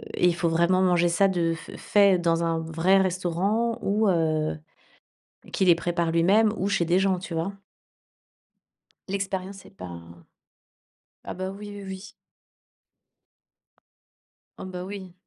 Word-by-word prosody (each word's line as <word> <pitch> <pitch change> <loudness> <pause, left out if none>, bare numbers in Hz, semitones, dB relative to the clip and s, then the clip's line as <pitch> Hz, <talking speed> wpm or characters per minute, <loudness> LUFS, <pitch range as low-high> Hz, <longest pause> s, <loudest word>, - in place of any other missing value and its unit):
et - - +1
il 170 - +2
faut 170 -1 0
vraiment 170 +3 +2
manger 175 -2 +3
ça 195 +4 +3
de 170 -3 0
f 165 - -12
fait 200 -3 +4
dans 170 -1 +1
un 165 -1 0
vrai 165 +4 +2
restaurant, 190 +5 0
ou 210 +1 +1
heu, 155 -3 0 1.0
qui 190 - +1
les 175 - +7
prépare 170 -1 -1
lui-même, 205 +6 +4
ou 195 - 0
chez 195 -4 +1
des 175 +2 +3
gens, 190 -2 +1
tu 175 -2 -7
vois? 165 +5 -2 1.6
L'expérience 195 0 -4
est - - -15
pas 90 -2 -9 1.3
ah - - -5
bah, 185 +1 -4
oui, 205 +1 -9
oui, 205 -1 -9
oui. 190 +2 -8 2.5
Ah, - - -8
bah, 180 -1 -6
oui. 190 -3 -8
185 Hz, 140 wpm, -25 LUFS, 170-195 Hz, 2.5 s, les